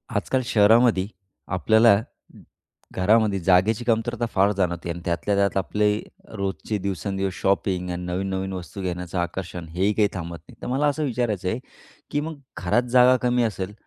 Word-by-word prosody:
आजकाल 130 +6 0
शहरामध्ये 110 -2 +4 0.5
आपल्याला 110 +4 +5 0.9
घरामध्ये 105 +1 +3
जागेची 95 +6 +3
कमतरता 120 +1 0
फार 100 +1 +3
जाणवते 85 -2 -1
आणि 85 +1 -3
त्यातल्या 85 +4 0
त्यात 100 0 +1
आपले 105 +2 +1 0.5
रोजचे 100 +2 -3
दिवसेंदिवस 95 0 -2
शॉपिंग 95 -2 0
आणि 90 0 -4
नवीन-नवीन 95 +1 -3
वस्तू 95 +2 -7
घेण्याचं 90 -1 -4
आकर्षण 85 -1 -4
हेही 95 +4 +2
काही 105 -1 +3
थांबत 85 -2 -5
नाही. - - -15
तर - - -5
मला 135 +4 +1
असं 145 +2 0
विचारायचं 110 -8 -1
आहे, 115 - -2 0.5
की 145 - +1
मग 160 0 -5 0.2
घरात 95 +8 +1
जागा 125 0 +6
कमी 125 0 +2
असेल 100 -3 -3
100 Hz, 150 wpm, -24 LUFS, 90-115 Hz, 0.9 s, जागा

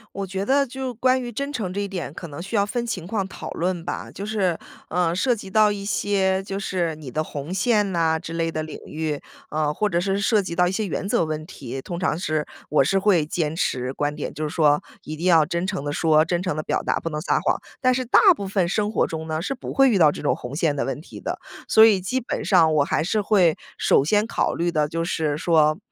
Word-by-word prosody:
我 195 -1 -3
觉 190 +1 -3
得 275 +3 +3
就 260 0 -5
关 255 +3 +2
于 245 -1 -5
真 280 +2 -3
诚 205 -10 -3
这 200 - -2
一 200 - -2
点 180 -7 -5
可 170 - -7
能 145 -1 -9
需 195 +6 -5
要 200 - +4
分 235 +4 -2
情 185 -7 -4
况 195 -2 -1
讨 - - -8
论 175 0 -2
吧， 175 - -5
就 195 - -7
是， 195 -6 0 0.3
呃， 175 -1 +1
涉 245 +8 +2
及 200 -3 -9
到 215 +1 +4
一 200 -1 -4
些 195 -2 +1
就 195 0 -4
是 175 -5 -1
你 145 -5 -8
的 155 +4 -1
红 145 +1 -6
线 205 +1 +2
呐 165 -2 +1
之 165 - -7
类 165 0 -1
的 155 - -2
领 155 0 -7
域。 155 -2 -3 0.3
呃， 150 -1 0
或 210 +6 0
者 170 -3 +1
是 195 +2 0
涉 210 +2 +3
及 170 - -5
到 180 +1 +3
一 - - 0
些 215 +3 -1
原 195 0 -3
则 170 - +2
问 155 0 -3
题， 135 -6 -7
通 170 +5 -6
常 180 -4 0
是 155 -4 -1 0.2
我 150 - +4
是 195 +8 +2
会 185 -6 +3
坚 155 0 -2
持 130 -6 -1
观 145 +1 -1
点， 150 - -4
就 155 0 -2
是 150 - -7
说 150 -3 +3 0.2
一 155 - -6
定 165 +3 -5
要 165 -4 +5
真 170 +2 -1
诚 190 -6 -3
地 145 - -2
说， 155 0 +3
真 175 +2 -1
诚 180 -5 -1
地 155 - -2
表 - - -1
达， - - 0
不 165 - -4
能 150 -1 -3
撒 155 - +1
谎。 - - +1 0.2
但 255 -1 +4
是 255 -1 -1
大 - - +5 0.2
部 200 -1 -5
分 190 -2 +1
生 210 +2 0
活 - - +1
中 160 0 -5
呢， 155 0 -2
是 275 +9 -3
不 - - -7
会 270 -1 +5
遇 220 - +3
到 155 -5 +6
这 - - -7
种 145 - +1
红 125 +3 -7
线 155 -3 +1
的 140 - -1
问 135 +2 -4
题 - - -11
的。 - - -4 0.3
所 220 - +7
以 210 -4 +5
基 255 +8 -1
本 240 - -4
上 165 -5 +5
我 145 - +4
还 150 - 0
是 210 +5 0
会 190 -6 +3 0.2
首 135 - +4
先 210 +5 +2
考 - - 0
虑 170 +1 0
的， 150 -3 +1
就 165 +2 -2
是 155 -3 -1
说， 155 -2 +3
175 Hz, 280 characters per minute, -23 LUFS, 155-200 Hz, 0.3 s, 所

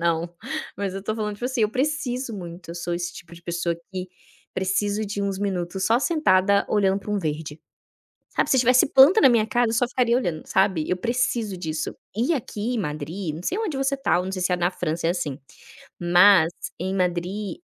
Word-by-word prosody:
não, 170 0 +1 0.5
mas 200 -2 -2
eu 195 - -4
estou 215 +2 -3
falando, 210 -1 -2
tipo 240 - -7
assim, 255 -3 -1
eu 210 - +2
preciso 260 -3 -1
muito, 175 -2 -9
eu - - -6
sou 175 0 -4
esse 175 0 -3
tipo 170 - -11
de 170 - -15
pessoa 170 0 -1 0.2
que 185 0 -4 0.5
preciso 205 +3 0
de 200 0 -3
uns 195 -1 -2
minutos, 190 -1 -2
só 230 +2 +4
sentada, 200 - +3
olhando 195 -2 +2
para 210 - -7
um 210 - +1
verde, 155 -3 -4 0.7
sabe, - - 0
se 265 - +4
tivesse 250 +2 +5
planta 290 +11 +8
na - - +7
minha 230 -4 +4
casa, 240 0 +1
eu - - -2
só 245 +2 +3
ficaria 245 -2 +2
olhando, 170 -10 -3
sabe, 185 -6 +2
eu 180 - +2
preciso 235 -2 -1
disso. 160 -3 -3 0.2
E 245 +9 +1
aqui 235 -3 -3
em 230 - -1
Madrid, 155 +1 -4
não 170 - -8
sei 380 - -1
onde 420 -10 -2
você 270 +1 0
tá 270 -9 +2
ou 180 - -3
não 190 - -4
sei 185 - -4
se 180 0 +1
é - - +3
na 175 +1 +1
França, 165 -1 -2
é - - +3
assim, 150 -6 -2 0.6
mas 175 -1 +6 0.3
em 185 +2 -2
Madrid 185 - -2
195 Hz, 215 wpm, -24 LUFS, 175-235 Hz, 0.7 s, planta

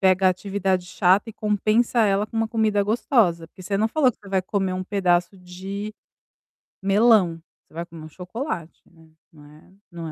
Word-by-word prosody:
pega 190 0 +4
a - - +6
atividade 190 -1 -1
chata 190 +4 +2
e - - -14
compensa 215 +3 +1
ela 205 -1 +2
com 225 - -9
uma 225 0 +1
comida 215 -3 +1
gostosa, 205 - +1
porque 185 - -14
você 195 +2 -2
não 220 +1 +2
falou 260 -2 +2
que - - -35
você 200 - -13
vai 190 -1 +1
comer 190 -1 -1
um 185 - -4
pedaço 185 -1 +1
de 195 +4 -7 0.9
melão, 195 -5 +4 0.3
você - - -26
vai 170 +1 -5
comer 165 -2 -12
um - - -10
chocolate, 180 - -6
né, 165 -1 -21 0.2
não 150 -2 -16
é, 150 +5 -18 0.2
não 170 -1 -7
é - - -6
195 Hz, 195 wpm, -23 LUFS, 180-215 Hz, 0.9 s, a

